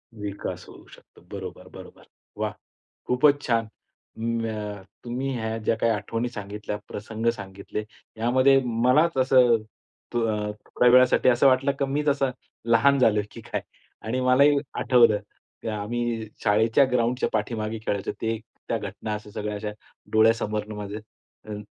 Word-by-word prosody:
विकास 105 -1 -5
होऊ - - -14
शकतो. - - -18
बरोबर, - - -7
बरोबर. - - -13 0.3
वाह! - - -1 0.6
खूपच 145 +3 +4
छान. 115 -4 0 0.5
म 115 0 -1
अ, 105 -2 -5 0.2
तुम्ही 125 +3 -3
ह्या 110 0 -2
ज्या 115 - +1
काही 115 0 +2
आठवणी 115 +3 -2
सांगितल्या, 105 -1 -5
प्रसंग 110 +2 -6
सांगितले, 100 0 -6 0.3
यामध्ये 130 +4 +4
मलाच 125 +7 +3
असं 130 -2 +5 0.6
तू 120 - +1
अ, 110 -1 0 0.3
थोड्या 125 - +3
वेळासाठी 125 0 +6
असं 125 +2 +5
वाटलं 135 +2 +3
की 140 - +2
मी 140 +2 -1
जसा 140 -2 +2 0.4
लहान 130 +4 +4
झालोय 105 -4 +4
की - - -10
काय? - - -4 0.4
आणि 115 +4 -2
मलाही 140 +3 +5 0.2
आठवलं, 120 -4 +5 0.4
की - - -7
आम्ही 115 +1 -2 0.2
शाळेच्या 110 +5 +4
ग्राउंडच्या 125 +1 +1
पाठीमागे 110 -1 -2
खेळायचो. 100 -1 -1
ते 115 0 0 0.3
त्या - - 0
घटना 110 - -5
अशा 105 0 -6
सगळ्या 105 0 -4
अशा 105 +1 -4 0.4
डोळ्यासमोरनं 110 -1 +2
माझ्या 105 +1 -5 0.5
हं, 105 0 -5
115 Hz, 145 wpm, -25 LUFS, 105-125 Hz, 0.6 s, वेळासाठी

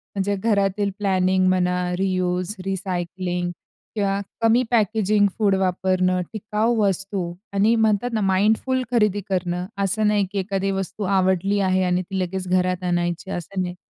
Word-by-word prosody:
म्हणजे 200 +1 0
घरातील 200 -1 +1
प्लॅनिंग 185 -1 +2
म्हणा 180 -1 +2 0.2
रियुज, 185 0 -1
रिसायकलिंग 180 -1 -3 0.4
किंवा 200 -1 0 0.2
कमी 230 +2 +4
पॅकेजिंग 215 -2 +3
फूड 200 -3 +3
वापरणं, 185 -1 +1
टिकाऊ 215 +2 0
वस्तू 195 -3 -1 0.2
आणि 210 +4 +3
म्हणतात 220 +1 +2
ना, 220 - 0
माइंडफुल 215 +7 +2
खरेदी 210 -4 +2
करणं 180 -1 -1 0.2
असं 210 +3 +1
नाही, 205 -2 +2
की 200 - -2
एखादी 195 0 -1
वस्तू 195 +2 -3
आवडली 190 +1 +1
आहे 185 -1 +2
आणि 180 0 +1
ती 190 +1 -4
लगेच 185 0 -3
घरात 185 0 +1
आणायची 175 +1 -1
असं 185 +2 -4
नाही. 180 0 -3
190 Hz, 140 wpm, -22 LUFS, 185-205 Hz, 0.4 s, कमी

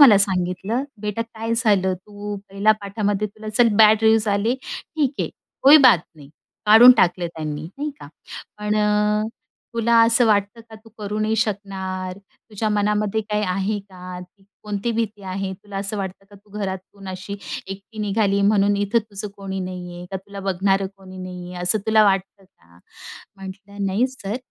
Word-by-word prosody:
मला 230 -9 +9
सांगितलं, 190 +5 -1 0.2
"बेटा 210 +2 -2
काय 225 0 -4
झालं? 200 -5 +2
तू 205 +2 -7
पहिल्या 200 +2 +3
पाठामध्ये 205 0 -1
तुला 215 +1 -10
चल 230 +2 +4
बॅड 215 0 +7
रिव्युज 220 -1 +4
आले. 205 +5 +1
ठीक 285 +1 -3
आहे, - - -1 0.3
कोई 285 +3 +9
बात 230 - +7 0.2
नही." 140 -2 -14 0.4
काढून 230 +4 +10
टाकलं 175 0 +2
त्यांनी 155 -3 -5 0.2
नाही 300 +1 -2
का, 145 - -10 0.5
"पण 210 0 -1
अ, 210 0 +2 0.5
तुला 235 0 +2
असं 230 +1 +4
वाटतं 205 +1 +1
का? 220 - -10
तू 220 +1 -15
करू 210 0 -4
नाही 220 +1 +1
शकणार. 190 -3 -3
तुझ्या 210 +2 -6
मनामध्ये 210 +1 +1
काही 210 0 -2
आहे 195 +3 -1
का? 185 -2 -10
ती 180 +2 -16 0.2
कोणती 210 +2 -2
भीती 215 -3 -3
आहे? 190 0 -4
तुला 200 +1 -10
असं 195 +2 -3
वाटतं 190 0 -5
का - - -15
तू 205 +1 -24
घरातून 195 0 -6
अशी 190 +2 -6 0.3
एकटी 200 +3 -9
निघाली 200 -1 +1
म्हणून 205 0 +3
इथं 205 +3 +2
तुझं 210 -1 -7
कोणी 195 -1 -5
नाही 180 -1 -6
आहे, 175 - -8
का 190 - -2
तुला 200 +1 -9
बघणारं 195 0 +1
कोणी 190 -1 -13
नाही 180 -1 -7
आहे 180 - -5
असं 215 +5 +2
तुला 220 -1 +5
वाटतं 195 0 0
का?" 85 - -25 0.6
म्हटलं, 195 +1 -7
"नाही 205 +7 +2
सर 230 -4 -5
200 Hz, 170 wpm, -22 LUFS, 190-215 Hz, 0.6 s, काढून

